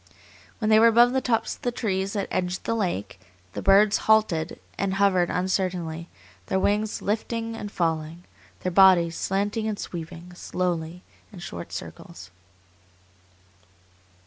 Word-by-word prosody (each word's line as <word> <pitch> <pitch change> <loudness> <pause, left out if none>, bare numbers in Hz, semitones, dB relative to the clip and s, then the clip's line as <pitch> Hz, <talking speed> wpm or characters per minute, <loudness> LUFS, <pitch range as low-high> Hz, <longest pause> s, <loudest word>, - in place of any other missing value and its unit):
When 215 -1 0
they 215 - +7
were 230 - +7
above 240 +2 +5
the 265 - +1
tops 235 -3 0
of - - -24
the 245 - -1
trees 195 -5 -2
that 200 -3 -2
edged 180 0 -2
the - - -1
lake, 175 - -3 0.3
the - - -4
birds 200 +2 +5
halted 195 -7 +2 0.2
and 195 -1 -1
hovered 190 -3 +3
uncertainly, 180 -3 -2 0.4
their 190 - 0
wings 210 +2 0
lifting 225 +2 -2
and 205 -2 -6
falling, 165 -1 -2 0.4
their 185 - -2
bodies 175 -3 +5
slanting 205 +3 -1
and 215 -2 -2
sweeping 170 0 -8
slowly, 175 -1 -3 0.3
in 205 - -12
short 85 - -8
circles. 90 +1 -9
190 Hz, 140 wpm, -25 LUFS, 175-215 Hz, 0.4 s, they